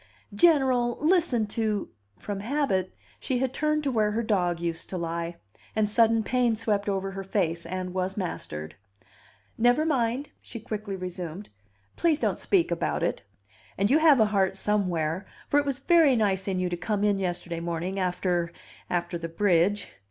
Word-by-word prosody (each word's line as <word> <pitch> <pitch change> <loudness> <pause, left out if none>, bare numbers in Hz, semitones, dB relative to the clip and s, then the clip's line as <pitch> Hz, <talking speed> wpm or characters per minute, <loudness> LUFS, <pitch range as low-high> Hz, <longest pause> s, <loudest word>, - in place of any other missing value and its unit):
General, 260 -8 +3
listen 315 - +2
to 210 -1 -2 0.2
" 100 -1 -41
From 205 -1 -3
habit 210 -6 -1 0.2
she 260 - -1
had 260 0 -1
turned 305 0 0
to 280 - 0
where 215 -3 +1
her 230 +2 0
dog 180 -6 +1
used 170 -1 -4
to 185 - -3
lie; 170 0 -3 0.4
and 215 -1 +2
sudden 225 +1 +3
pain 245 0 +2
swept 210 -2 -1
over 195 0 -1
her 195 0 -6
face 170 -4 -1
and 185 0 -4
was 185 +1 -2
mastered. 80 - -5 0.9
"Never 245 +6 +4
mind!" 260 -2 0
she 230 - -8
quickly 215 -2 -5
resumed. 180 0 -6 0.5
"Please 330 -3 +3
don't - - -1
speak 365 -4 +2
about - - -1
it. - - -1 0.6
And 200 +4 +2
you 300 - +5
have 310 -5 +6
a 220 - +6
heart 195 -2 +1
somewhere; 185 -4 0 0.2
for 290 - +3
it 290 - -2
was 275 -2 0
very 310 -2 +4
nice 195 -4 +1
in 190 -2 0
you 185 - 0
to 175 0 -3
come 205 +3 -1
in 205 -2 +2
yesterday 175 -2 -3
morning 170 +3 -3
after 180 -2 0 0.4
after 175 0 -2
the 165 0 -5
bridge." 190 +2 +2
205 Hz, 175 wpm, -27 LUFS, 180-240 Hz, 0.9 s, have